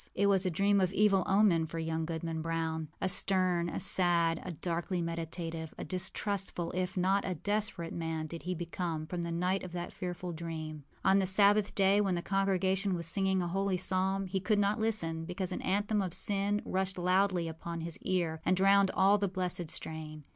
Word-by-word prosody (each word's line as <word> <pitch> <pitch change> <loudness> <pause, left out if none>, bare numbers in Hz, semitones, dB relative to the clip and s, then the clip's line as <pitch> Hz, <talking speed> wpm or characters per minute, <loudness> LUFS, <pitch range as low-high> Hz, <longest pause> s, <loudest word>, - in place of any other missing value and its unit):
it 200 - +2
was 195 -1 +3
a - - +2
dream 200 +3 +2
of 185 -1 +1
evil 200 -2 +3
omen 190 -5 +3
for 165 - -7
young 160 0 -2
Goodman 165 0 -3
Brown. 160 -1 -2
A - - 0
stern, 185 -2 +2
a - - -4
sad, 170 -2 +2
a - - -6
darkly 175 +3 -3
meditative, 165 -1 -4
a - - -5
distrustful, 190 -1 -2
if 185 +1 -3
not 190 +2 +2
a 185 - -2
desperate 205 -2 -2
man 160 -1 -3
did 165 +2 -7
he 180 0 -3
become 170 -2 -4
from 175 +2 -4
the 170 - -3
night 180 +3 0
of 180 -1 -8
that 175 -1 -5
fearful 180 0 -5
dream. 155 -3 -6 0.2
On 190 +1 +5
the 190 - +1
Sabbath 200 +2 +5
day, 200 +1 +4
when 195 -3 +1
the 170 - -3
congregation 195 0 +1
were 170 - -4
singing 190 +2 +2
a - - -2
holy 195 +1 0
psalm, 190 +1 0
he 190 +1 -2
could 210 +3 +1
not 205 +1 +1
listen 170 -8 0
because 180 +1 -4
an - - -3
anthem 205 +2 0
of 185 -3 -3
sin 205 +1 -1
rushed 190 0 -2
loudly 180 -1 +2
upon 165 +1 -6
his 165 0 -5
ear 170 -4 -1
and 185 - +2
drowned 195 +1 +5
all 200 +2 +4
the 200 - +1
blessed 180 -3 -2
strain. 155 -1 -5
180 Hz, 195 wpm, -31 LUFS, 165-195 Hz, 0.2 s, On